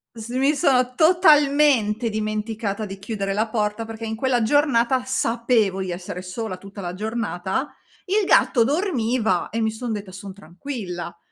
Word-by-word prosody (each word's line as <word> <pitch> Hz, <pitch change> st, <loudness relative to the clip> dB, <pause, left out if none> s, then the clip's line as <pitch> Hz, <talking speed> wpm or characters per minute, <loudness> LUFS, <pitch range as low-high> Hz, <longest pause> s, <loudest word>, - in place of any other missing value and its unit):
s 225 Hz, -1 st, -8 dB
mi 270 Hz, +4 st, +2 dB
sono 255 Hz, -2 st, +2 dB
totalmente 290 Hz, -, +4 dB
dimenticata 215 Hz, 0 st, -3 dB
di 195 Hz, -2 st, -7 dB
chiudere 200 Hz, -1 st, -3 dB
la 215 Hz, +3 st, 0 dB
porta 215 Hz, 0 st, -2 dB
perché 225 Hz, 0 st, -8 dB
in 220 Hz, 0 st, -4 dB
quella 250 Hz, 0 st, +1 dB
giornata 255 Hz, 0 st, +2 dB
sapevo 235 Hz, -5 st, +1 dB
di 190 Hz, -1 st, -3 dB
essere 175 Hz, 0 st, -6 dB
sola 185 Hz, +2 st, -5 dB
tutta 200 Hz, +2 st, -10 dB
la 175 Hz, -1 st, -4 dB
giornata. 215 Hz, +3 st, -3 dB, 0.3 s
Il 405 Hz, +2 st, +1 dB
gatto 240 Hz, -9 st, +4 dB
dormiva 245 Hz, -, 0 dB
e 230 Hz, -, -2 dB
mi 220 Hz, 0 st, +1 dB
son 225 Hz, +1 st, -4 dB
detta: 205 Hz, -2 st, -6 dB
"Son 195 Hz, +1 st, -9 dB
tranquilla." 185 Hz, -, -7 dB
225 Hz, 155 wpm, -22 LUFS, 200-260 Hz, 0.3 s, totalmente